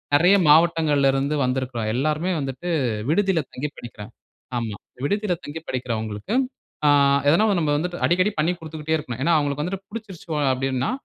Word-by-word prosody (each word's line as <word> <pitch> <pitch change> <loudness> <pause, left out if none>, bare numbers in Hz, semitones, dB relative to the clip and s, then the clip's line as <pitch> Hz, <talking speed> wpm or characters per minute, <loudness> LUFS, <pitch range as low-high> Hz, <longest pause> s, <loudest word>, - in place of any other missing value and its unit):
நெறைய 175 +7 +6
மாவட்டங்கள்ல 155 -3 +4
இருந்து 140 +2 0
வந்திருக்கிறோம். 125 -3 -2
எல்லோருமே 155 +7 0
வந்துட்டு, 135 +5 -4 0.4
விடுதியில 190 0 +2
தங்கி 150 +4 -4
படிக்கிறாங்க. 105 -3 -10 0.5
ஆமா. 110 -3 -4 0.3
விடுதியில 205 +2 0
தங்கி 155 +3 -6
படிக்கிறவங்களுக்கு 110 - -3 0.5
அ - - +6 0.4
எதனா 170 +9 +4
நம்ம 155 -3 0
வந்துட்டு 175 +3 -3
அடிக்கடி 185 +4 +2
பண்ணிக் 170 +3 +1
குடுத்துட்டே 160 0 -3
இருப்பேன். 125 -6 -6
ஏன்னா, 170 - +2
அவுங்களுக்கு 145 -1 -1
வந்துட்டு 190 +3 -5
பிடிச்சிடுச்சோ 200 -7 -8 0.2
அப்பிடின்னா, 130 - -1
150 Hz, 140 wpm, -23 LUFS, 130-175 Hz, 0.5 s, நெறைய